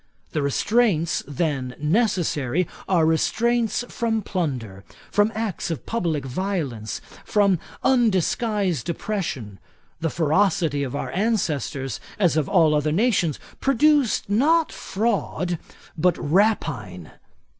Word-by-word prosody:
The 150 Hz, -, -1 dB
restraints 170 Hz, -, +2 dB
then 140 Hz, -4 st, -2 dB
necessary, 170 Hz, -, +1 dB, 0.2 s
are 175 Hz, -4 st, +4 dB
restraints 230 Hz, +8 st, +1 dB
from 225 Hz, -3 st, -1 dB
plunder, 125 Hz, -, -3 dB, 0.3 s
from 205 Hz, +1 st, +3 dB
acts 215 Hz, -4 st, -2 dB
of 165 Hz, -, -4 dB
publick 165 Hz, -11 st, -1 dB
violence, 135 Hz, -, -3 dB, 0.3 s
and 200 Hz, -4 st, +4 dB, 0.2 s
undisguised 210 Hz, -, +1 dB
oppression. 155 Hz, -, -3 dB, 0.4 s
The 165 Hz, 0 st, 0 dB
ferocity 160 Hz, -2 st, +1 dB
of 135 Hz, -1 st, -3 dB
our -, -, -3 dB
ancestors, 150 Hz, -, -1 dB, 0.2 s
as 180 Hz, -6 st, +3 dB
of 155 Hz, -3 st, 0 dB
all 155 Hz, -2 st, +4 dB
other 150 Hz, 0 st, +1 dB
nations, 180 Hz, -, +2 dB, 0.2 s
produced 275 Hz, -1 st, +3 dB
not 300 Hz, +11 st, +3 dB
fraud, 190 Hz, -5 st, -2 dB, 0.4 s
but 175 Hz, +1 st, +2 dB
rapine. 145 Hz, -, 0 dB
175 Hz, 105 wpm, -23 LUFS, 145-215 Hz, 0.4 s, are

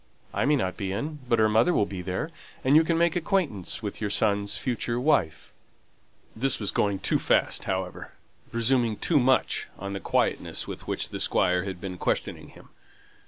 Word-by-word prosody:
I -, -, 0 dB
may 150 Hz, +2 st, +4 dB
not 95 Hz, -9 st, -1 dB
be 100 Hz, -3 st, -3 dB
in; 150 Hz, +10 st, -4 dB
but 115 Hz, -, +4 dB
her 110 Hz, -1 st, +4 dB
mother 115 Hz, +11 st, +3 dB
will 105 Hz, -, +3 dB
be 95 Hz, -2 st, -6 dB
there, 95 Hz, -, -3 dB, 0.3 s
and 135 Hz, +3 st, +4 dB
you 160 Hz, -, +7 dB
can 165 Hz, +1 st, 0 dB
make 170 Hz, -1 st, +2 dB
acquaintance 160 Hz, -, -1 dB
with 105 Hz, 0 st, -5 dB
your 105 Hz, -, -1 dB
son's 100 Hz, 0 st, +1 dB
future 120 Hz, -1 st, -2 dB
wife." 100 Hz, -, 0 dB, 0.8 s
This 130 Hz, +3 st, +2 dB
was 105 Hz, -, 0 dB
going 100 Hz, -1 st, +1 dB
too -, -, +1 dB
fast, -, -, +1 dB
however; 95 Hz, -1 st, -4 dB, 0.4 s
presuming 115 Hz, -1 st, +1 dB
too 160 Hz, -4 st, +2 dB
much 130 Hz, +1 st, +2 dB
on 100 Hz, +1 st, -5 dB
the 100 Hz, -, -3 dB
quietness -, -, 0 dB
with -, -, -7 dB
which -, -, -2 dB
the -, -, -6 dB
Squire 90 Hz, 0 st, +2 dB
had 95 Hz, -2 st, -5 dB
been 90 Hz, -1 st, -6 dB
questioning -, -, -2 dB
him. -, -, -17 dB
110 Hz, 185 wpm, -26 LUFS, 95-135 Hz, 0.8 s, you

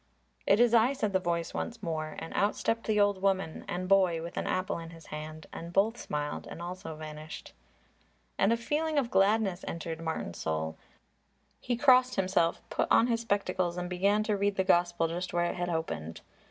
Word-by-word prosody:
"It 200 Hz, -, +5 dB
is 240 Hz, -1 st, +5 dB
I," 235 Hz, +3 st, +5 dB
said 215 Hz, -7 st, -2 dB
the 190 Hz, -, +3 dB
voice 170 Hz, -2 st, -2 dB
once 235 Hz, -1 st, -4 dB
more, 155 Hz, -2 st, -3 dB
and 165 Hz, -, -7 dB
out 205 Hz, +1 st, +2 dB
stepped 230 Hz, 0 st, -1 dB
the 215 Hz, -1 st, +2 dB
old 205 Hz, -2 st, +3 dB
woman 190 Hz, -4 st, 0 dB
and 180 Hz, +1 st, -3 dB
boy 185 Hz, -4 st, +3 dB
with 170 Hz, -, -7 dB
an -, -, -2 dB
apple 185 Hz, -2 st, -1 dB
in 165 Hz, 0 st, -8 dB
his 165 Hz, -1 st, -13 dB
hand, 155 Hz, +1 st, -7 dB
and 170 Hz, +1 st, -7 dB
both 205 Hz, +5 st, +3 dB
smiled 150 Hz, -8 st, -4 dB
and -, -, -8 dB
also 175 Hz, -1 st, -6 dB
vanished. 155 Hz, 0 st, -8 dB, 0.9 s
And 195 Hz, -, +4 dB
a 230 Hz, -, +3 dB
feeling 300 Hz, +6 st, -1 dB
of 255 Hz, -4 st, +1 dB
gladness 195 Hz, -1 st, +2 dB
entered 165 Hz, -1 st, -4 dB
Martin's 160 Hz, -, -4 dB
soul. 80 Hz, 0 st, -2 dB, 0.8 s
He 245 Hz, -1 st, -2 dB
crossed 255 Hz, -1 st, +5 dB
himself, 185 Hz, -3 st, +1 dB
put -, -, 0 dB
on -, -, +6 dB
his 230 Hz, -1 st, 0 dB
spectacles 185 Hz, -5 st, 0 dB
and 180 Hz, 0 st, -4 dB
began 200 Hz, +4 st, +2 dB
to 215 Hz, -1 st, 0 dB
read 200 Hz, 0 st, +1 dB
the 190 Hz, -, +2 dB
Gospel 175 Hz, -2 st, +3 dB
just 175 Hz, +2 st, -4 dB
where 175 Hz, 0 st, +2 dB
it 175 Hz, -, -2 dB
had 175 Hz, 0 st, -2 dB
opened. 80 Hz, -, -3 dB
185 Hz, 195 wpm, -30 LUFS, 165-210 Hz, 0.9 s, on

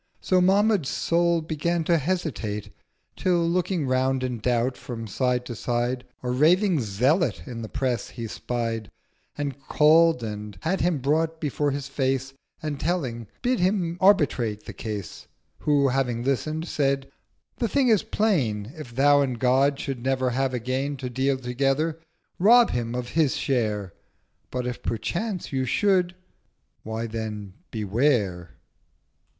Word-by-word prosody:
So 185 Hz, -1 st, +2 dB
Mahmud's 195 Hz, -3 st, +3 dB
Soul 170 Hz, 0 st, +1 dB
began 165 Hz, +2 st, -1 dB
to 170 Hz, 0 st, +3 dB
hesitate: 135 Hz, -, -3 dB, 0.4 s
Till 175 Hz, -2 st, +1 dB
looking 175 Hz, -2 st, 0 dB
round 130 Hz, 0 st, +1 dB
in 125 Hz, -2 st, -2 dB
Doubt 120 Hz, +2 st, +1 dB
from 115 Hz, -2 st, -7 dB
side 125 Hz, +3 st, 0 dB
to 125 Hz, -, -5 dB
side 120 Hz, +2 st, -1 dB, 0.2 s
A 125 Hz, -, -1 dB
raving 170 Hz, +6 st, +4 dB
Zealot 130 Hz, -, +1 dB
in 120 Hz, -3 st, -6 dB
the 110 Hz, -, -6 dB
Press 130 Hz, -3 st, -1 dB
he 115 Hz, -1 st, -6 dB
spied, 115 Hz, -1 st, -3 dB, 0.5 s
And 140 Hz, -2 st, -4 dB
call'd 160 Hz, -2 st, +5 dB
and 105 Hz, -2 st, -6 dB
had 190 Hz, +4 st, 0 dB
him 175 Hz, -2 st, +2 dB
brought 160 Hz, +4 st, +1 dB
before 145 Hz, -1 st, 0 dB
his 140 Hz, 0 st, -3 dB
Face, 135 Hz, -1 st, -1 dB, 0.3 s
And, 150 Hz, -3 st, -3 dB
telling, 130 Hz, -, -2 dB, 0.2 s
bid 250 Hz, 0 st, +1 dB
him 180 Hz, -2 st, 0 dB
arbitrate 130 Hz, -, +3 dB
the -, -, -7 dB
case. 105 Hz, -5 st, -6 dB, 0.3 s
Who, 145 Hz, -2 st, +3 dB
having 125 Hz, -3 st, 0 dB
listen'd, 155 Hz, +5 st, -1 dB
said—'The 140 Hz, -, -3 dB
Thing 265 Hz, +2 st, +2 dB
is 215 Hz, -4 st, +5 dB
plain: 140 Hz, -, 0 dB
1020 155 Hz, -, -9 dB
If 120 Hz, -5 st, -10 dB
Thou 145 Hz, +2 st, +5 dB
and 130 Hz, -3 st, -1 dB
God 135 Hz, +3 st, +3 dB
should 135 Hz, -4 st, -4 dB
never 130 Hz, -1 st, +1 dB
have 135 Hz, +1 st, 0 dB
again 130 Hz, +4 st, -2 dB
To 125 Hz, -1 st, -5 dB
deal 135 Hz, +2 st, +1 dB
together, 135 Hz, +5 st, 0 dB, 0.4 s
rob 230 Hz, +5 st, +6 dB
him 120 Hz, 0 st, -2 dB
of 125 Hz, -1 st, -3 dB
his 155 Hz, -4 st, +2 dB
share: 105 Hz, -8 st, -1 dB, 0.6 s
But 125 Hz, -1 st, -3 dB
if 125 Hz, 0 st, -4 dB
perchance 175 Hz, -, -3 dB
you 130 Hz, -1 st, +1 dB
should—why 180 Hz, -, -2 dB
then 110 Hz, -3 st, -5 dB, 0.2 s
Beware!' 105 Hz, -, 0 dB
135 Hz, 145 wpm, -25 LUFS, 120-165 Hz, 0.6 s, rob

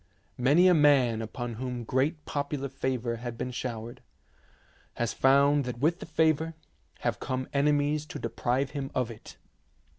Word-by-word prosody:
Many 145 Hz, +9 st, +5 dB
a 180 Hz, -, +6 dB
man 135 Hz, -7 st, +4 dB
upon 120 Hz, +2 st, -5 dB
whom 125 Hz, -2 st, -3 dB
great 140 Hz, +7 st, 0 dB
popular 140 Hz, -1 st, -3 dB
favour 130 Hz, -3 st, -2 dB
has 120 Hz, 0 st, -6 dB
been 125 Hz, +2 st, -4 dB
showered, 120 Hz, -2 st, -5 dB, 0.9 s
has 120 Hz, -1 st, -1 dB
found 140 Hz, +2 st, +4 dB
that 125 Hz, -1 st, -4 dB
with 160 Hz, +7 st, +1 dB
the -, -, -8 dB
favour 160 Hz, 0 st, +1 dB, 0.5 s
have -, -, -1 dB
come 130 Hz, 0 st, -3 dB
enemies 145 Hz, +1 st, +1 dB
to -, -, -6 dB
deprive 125 Hz, +4 st, -1 dB
him 140 Hz, -2 st, -4 dB
of 125 Hz, -2 st, 0 dB
it. 110 Hz, -, -12 dB
135 Hz, 150 wpm, -28 LUFS, 120-145 Hz, 0.9 s, a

